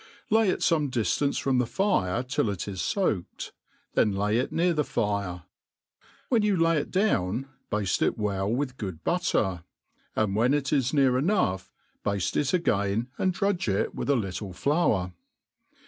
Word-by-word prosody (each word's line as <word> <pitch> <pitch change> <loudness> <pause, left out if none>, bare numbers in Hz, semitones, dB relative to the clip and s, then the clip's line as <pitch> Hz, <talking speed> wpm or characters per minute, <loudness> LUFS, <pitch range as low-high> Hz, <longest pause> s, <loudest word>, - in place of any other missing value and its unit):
Lay 220 -2 +4
it - - -1
fome 155 -4 +2
drftance 130 +3 0
from 130 -2 +1
the 125 - +2
firetillit 120 - 0
is 95 -3 -4
foaked, 105 - -2 0.4
then 105 - +3
lay 105 +3 +1
it 130 - -2
near 175 +1 +2
tht: 150 -3 0
fire. 100 -6 -2 0.8
When 235 -4 +3
you 210 -2 +2
Tay 165 - +3
^ 165 0 +3
it 145 - -1
down, 135 - 0 0.2
bafte 105 -3 0
it - - +1
Well 100 -1 -1
with 130 +1 -2
good 95 -6 -6
butter; 105 - 0 0.5
ind 105 -3 +1
when 120 +6 +3
it 145 0 -1
is 135 -3 +2
h^ar 135 -3 +3
chough, 95 - +1 0.3
bafte 100 -4 -1
it 145 -2 +1
again, 110 - 0
and 190 - +2
drudge 195 -2 -1
k>ith 100 +6 -1
a 140 - +4
little 95 -3 -3
fibur. 105 - +1
120 Hz, 160 wpm, -27 LUFS, 100-155 Hz, 0.8 s, Lay